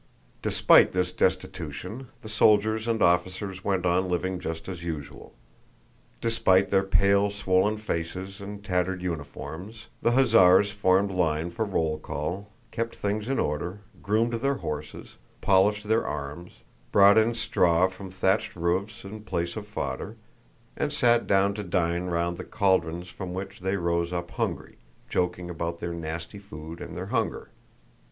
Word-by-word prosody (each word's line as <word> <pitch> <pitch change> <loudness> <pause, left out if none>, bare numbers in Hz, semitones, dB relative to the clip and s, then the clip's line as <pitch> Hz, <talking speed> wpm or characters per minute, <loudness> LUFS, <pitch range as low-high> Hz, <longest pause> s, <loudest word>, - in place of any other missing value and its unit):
Despite - - +5
this 90 -1 0
destitution, 95 - -2
the - - -9
soldiers 110 +1 +3
and 115 -1 +1
officers 95 +2 +1
went 95 -3 0
on 90 +1 +2
living 90 +1 -1
just 80 -1 -5
as 90 -3 -6
usual. 80 -4 -7 0.9
Despite 105 -5 +3
their 95 -1 +4
pale 100 +1 +3
swollen 100 +1 +1
faces 95 0 -4
and 100 +1 -8
tattered 90 0 -1
uniforms, 85 +6 -6
the 120 - +2
hussars 105 -6 +6
formed 100 -1 +2
line 85 -2 0
for 110 +6 -1
roll 80 -6 -1
call, 90 +7 -4 0.2
kept 115 0 -3
things 105 +3 -2
in 135 - 0
order, 85 +7 -2 0.2
groomed 110 +3 +1
their 135 +4 0
horses, 75 - -6 0.2
polished 105 +2 +3
their 110 +1 +2
arms, 75 +4 -6 0.3
brought 100 +2 +7
in 115 +2 +2
straw 90 -6 +3
from 95 +1 -9
the 90 - -16
thatched 95 +3 +1
roofs 90 +5 -1
in 105 +2 -8
place 85 -5 -3
of 105 -1 -6
fodder, 105 - -4 0.6
and 150 - -1
sat 120 -5 +3
down 100 +1 +3
to 105 - -4
dine 85 -1 0
round 85 0 -1
the 90 - -6
caldrons 90 -3 0
from 90 0 -6
which 95 +1 -6
they 95 +1 -1
rose 85 -1 0
up 85 -1 -4
hungry, - - -3 0.3
joking 90 0 -1
about 85 -1 -4
their 85 0 -4
nasty 85 +3 -6
food 80 -4 -9
and - - -7
their - - -4
hunger. - - -1
95 Hz, 150 wpm, -27 LUFS, 85-105 Hz, 0.9 s, brought